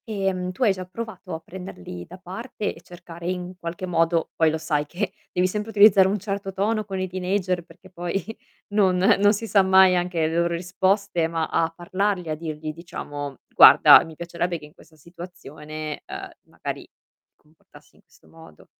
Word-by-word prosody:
Ehm, 195 -4 -2
tu 190 - -3
hai 210 -5 +4
già 185 -1 -6
provato 190 -3 -7
a - - -6
prenderli 160 - -9
da 180 - -11
parte 205 +4 -5
e 165 - -16
cercare 175 0 -9
in 180 0 -4
qualche 170 +2 -5
modo 165 -2 +1
poi 160 -1 +3
lo 160 - -1
sai 150 -2 -1
che, 190 +4 -3 0.2
devi 180 - +1
sempre 210 +3 -4
utilizzare 200 -3 +6
un 200 +2 0
certo 195 -1 -4
tono 215 +3 0
con 190 -1 -4
i 185 - -1
teenager 185 -1 -1
perché 175 +3 -18
poi 175 +1 -3 0.5
non 195 -3 +3
non 200 +2 +4
si 225 +2 -4
sa 205 -2 +4
mai 190 -1 +6
anche 175 -2 0
le 160 - -3
loro 170 0 +1
risposte, 185 0 0
ma 165 -1 -1
a 165 - +1
parlargli 185 0 -2
a 155 - -1
dirgli 155 -1 -6
diciamo: 145 -4 -7
"Guarda - - +9
mi 160 -1 -11
piacerebbe 170 +1 -3
che 150 - -12
in 150 - -17
questa 160 - -20
situazione, 155 -2 -9
ehm, - - -7 0.2
magari - - -6
ti - - -32
comportassi 150 -1 -22
in - - -24
questo 175 -5 -25
modo." 160 - -16
180 Hz, 185 wpm, -24 LUFS, 165-195 Hz, 0.5 s, Guarda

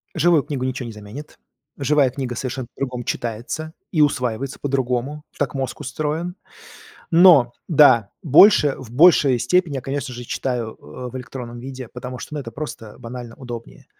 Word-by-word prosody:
Живую 170 -4 +4
книгу 140 -4 -3
ниче 130 -1 -3
не 115 - -6
заменит. 105 +8 -10 0.4
Живая 145 -1 +3
книга 125 -1 -4
совершенно 130 0 -4
по-другому 125 -2 -4
читается 120 +7 -4 0.2
и 160 - +2
усваивается 135 -2 0
по-другому, 135 +1 -2
так 140 -3 -1
мозг 135 -1 -3
устроен. 155 +5 -3 0.8
Но 165 -8 +7 0.2
да, 140 - +5
больше 150 0 +6
в 125 -4 -11
большей 140 -3 +5
степени, 155 +5 +1
я, - - -2
конечно 135 -1 -4
же, 120 0 -7
читаю, 120 -2 -3
э, 125 +12 -8
в 130 - -7
электронном 120 -1 -7
виде, 130 0 -8
потому 125 +1 -7
что, 150 - -8
ну, 150 - -3
это 120 -4 -7
просто 115 -6 -7
банально 120 -1 -8
удобнее. 115 - -9
130 Hz, 160 wpm, -21 LUFS, 120-150 Hz, 0.8 s, Но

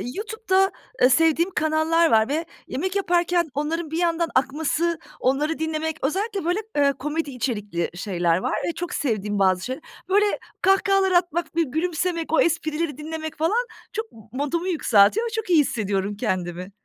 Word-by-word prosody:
YouTube'da, 415 -3 +1 0.3
ııı, 250 - +7
sevdiğim 325 +6 +3
kanallar 315 +1 +2
var 220 0 +5
ve 320 +3 -1 0.2
yemek 370 +8 -3
yaparken 345 -3 +1
onların 310 +2 -2
bir 320 - -2
yandan 335 -1 +1
akması, 320 +5 +1 0.2
onları 295 +5 0
dinlemek. 320 0 -2
Özellikle 390 +4 -1
böyle, 355 +4 +1 0.2
ııı, 280 -1 +4
komedi 300 +2 -3
içerikli 210 -9 -2
şeyler 175 -3 0
var - - -2
ve - - +1
çok 350 0 -5
sevdiğim 210 -6 -1
bazı 185 -1 +3
şey 260 +3 -4 0.3
Böyle 410 +2 +4 0.4
kahkahalar 390 0 +3
atmak, 345 -2 +1
bir 335 - +3
gülümsemek, 330 +2 -2
o - - +5
esprileri 315 -2 0
dinlemek 315 +1 -6
falan 430 +11 +1 0.3
çok 445 +1 -4
m 225 - -15
modumu 295 +7 -2
yükseltiyor 305 - +4
ve - - -3
çok 445 -4 -3
iyi 335 -3 +6
hissediyorum 205 -6 0
kendimi. 185 -3 -3
320 Hz, 155 wpm, -24 LUFS, 255-350 Hz, 0.4 s, ııı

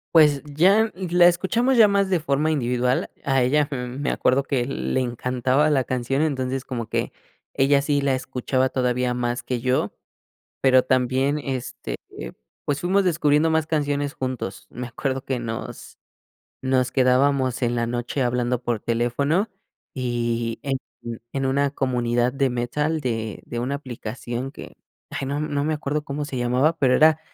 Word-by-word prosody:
Pues 150 -3 +6
ya 190 +10 +3
la 175 -2 +4
escuchamos 225 +9 +2
ya 220 -2 +8
más 200 -1 +2
de 180 - +2
forma 150 0 0
individual, 125 -3 0
a 135 -2 +2
ella, 145 +3 +2
mm, 125 0 -5
me 145 - 0
acuerdo 130 +2 +2
que 135 -3 -1
le 130 0 -1
encantaba 125 +4 +1
la 135 -4 +2
canción, 130 +4 -1
entonces 130 -3 -1
como 120 -4 -4
que - - -2 0.4
ella 140 +1 +3
sí 145 -1 +1
la 140 -1 +2
escuchaba 130 0 -1
todavía 125 -1 0
más 120 0 -2
que 125 -2 -3
yo, 130 0 0 0.7
pero 130 -1 +5
también, 130 +3 +1
este, 130 - -4 0.7
pues, 145 0 0
fuimos 190 +3 +3
descubriendo 155 -3 +3
más 160 -1 +1
canciones 145 -2 0
juntos, 130 -9 -5
me 125 0 -6
acuerdo 130 +2 -3
que 130 -2 -2
nos 115 -1 -6 0.7
nos 130 -1 +1
quedábamos 130 0 +2
en 120 0 +1
la 115 -1 0
noche 120 +3 -2
hablando 125 0 0
por 120 -2 -1
teléfono 140 - 0 0.5
y 120 -2 -1
en 135 -1 -1 0.6
en 135 -1 0
una 140 +1 +1
comunidad 120 -2 0
de 135 -2 +1
metal 150 +6 -1
de 115 -4 -3
de 120 - -5
una 130 +4 -2
aplicación 125 -1 -5
que, - - -10 0.4
ay, 135 - -4
no 140 +2 -2
no 150 -2 -1
me 155 +1 0
acuerdo 150 0 -2
cómo 145 +1 -4
se 140 -3 -5
llamaba 125 +7 +2
pero 130 -4 +3
era 155 0 +5
135 Hz, 160 wpm, -23 LUFS, 125-150 Hz, 0.7 s, ya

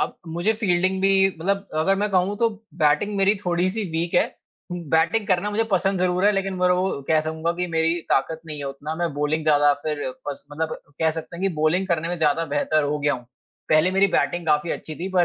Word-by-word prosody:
अब - - -2
मुझे 175 +7 0
फ़ील्डिंग 185 -1 +1
भी 195 0 +4
मतलब 195 +3 -1
अगर 160 +5 +2
मैं 210 +1 0
कहूँ 190 +2 +1
तो 230 -1 +3 0.3
बैटिंग 150 +8 +2
मेरी 195 +1 +3
थोड़ी-सी 185 +5 0
वीक 165 +1 -2
है, - - +4 0.5
बैटिंग 170 +5 +1
करना 185 +3 +1
मुझे 225 +2 +1
पसंद 190 0 +1
ज़रूर 180 +1 +1
है 205 - +6
लेकिन 195 -1 -2
ब्रो 180 +1 +2 0.2
कह 155 -1 +4
सकूँगा 160 +2 -2
कि 180 +1 -2
मेरी 165 0 +1 0.2
ताकत 160 +4 +1
नहीं 150 -2 -6
है 145 - -5
उतना, 140 +3 -5
मैं 170 -1 -2
बॉलिंग 150 +2 0
ज़्यादा 145 -1 +5
फिर 150 -2 -2 0.3
पस 140 - -6
मतलब 160 +1 -2 0.2
कह 160 -1 +3
सकते 160 +2 -7
हैं 180 - -7
कि 195 - +3
बॉलिंग 155 +5 +1
करने 165 -1 0
में 175 - -2
ज़्यादा 160 0 +1
बेहतर 155 +1 +1
हो 145 +1 -1
गया 145 0 +1
हूँ। 125 -2 -10 0.4
पहले 155 +4 +4
मेरी 195 +1 +4
बैटिंग 165 +4 0
काफ़ी 150 +2 +2
अच्छी 155 - -5
थी 180 +3 -4
पर 175 - +6
170 Hz, 215 wpm, -23 LUFS, 155-190 Hz, 0.5 s, है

